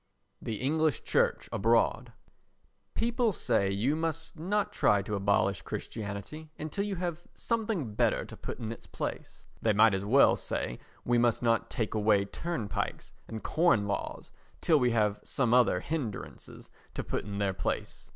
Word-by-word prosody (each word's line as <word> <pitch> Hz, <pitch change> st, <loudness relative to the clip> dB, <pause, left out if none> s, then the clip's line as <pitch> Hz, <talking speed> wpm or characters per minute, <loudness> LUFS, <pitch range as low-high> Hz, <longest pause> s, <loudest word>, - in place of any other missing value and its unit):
The 110 Hz, -, -3 dB
English 155 Hz, 0 st, +1 dB
Church -, -, +1 dB
Abroad 115 Hz, +2 st, +2 dB, 0.8 s
People 235 Hz, 0 st, +1 dB
say 115 Hz, -, +1 dB
you 110 Hz, +10 st, +1 dB
must 165 Hz, 0 st, -3 dB
not 195 Hz, +6 st, -1 dB
try 100 Hz, -1 st, +3 dB
to 105 Hz, -, -5 dB
abolish 100 Hz, -1 st, +2 dB
Christianity 110 Hz, +9 st, -6 dB
until 160 Hz, +6 st, -3 dB
you 205 Hz, -2 st, -2 dB
have 175 Hz, -1 st, -4 dB
something 215 Hz, -, -1 dB
better -, -, +1 dB
to -, -, -10 dB
put -, -, -6 dB
in 115 Hz, -3 st, -4 dB
its 115 Hz, -, -9 dB
place. -, -, -6 dB, 0.2 s
They 110 Hz, -, +3 dB
might 110 Hz, +1 st, +6 dB
as 95 Hz, 0 st, -1 dB
well 130 Hz, +7 st, +5 dB
say -, -, -3 dB, 0.3 s
we 120 Hz, 0 st, +3 dB
must 120 Hz, 0 st, +2 dB
not 115 Hz, -1 st, +2 dB
take 110 Hz, -3 st, -2 dB
away 105 Hz, -2 st, +3 dB
turnpikes 150 Hz, -, -4 dB
and 110 Hz, -1 st, -6 dB
corn 160 Hz, -11 st, +3 dB
laws 100 Hz, -, -4 dB, 0.3 s
till 155 Hz, -3 st, +4 dB
we 125 Hz, -2 st, +3 dB
have 105 Hz, -3 st, +1 dB
some 120 Hz, -4 st, +1 dB
other 120 Hz, -7 st, +4 dB
hindrances 145 Hz, -10 st, -5 dB, 0.2 s
to -, -, -2 dB
put -, -, -2 dB
in 100 Hz, -1 st, -5 dB
their 100 Hz, -1 st, +1 dB
place. -, -, -3 dB
120 Hz, 160 wpm, -30 LUFS, 105-160 Hz, 0.8 s, might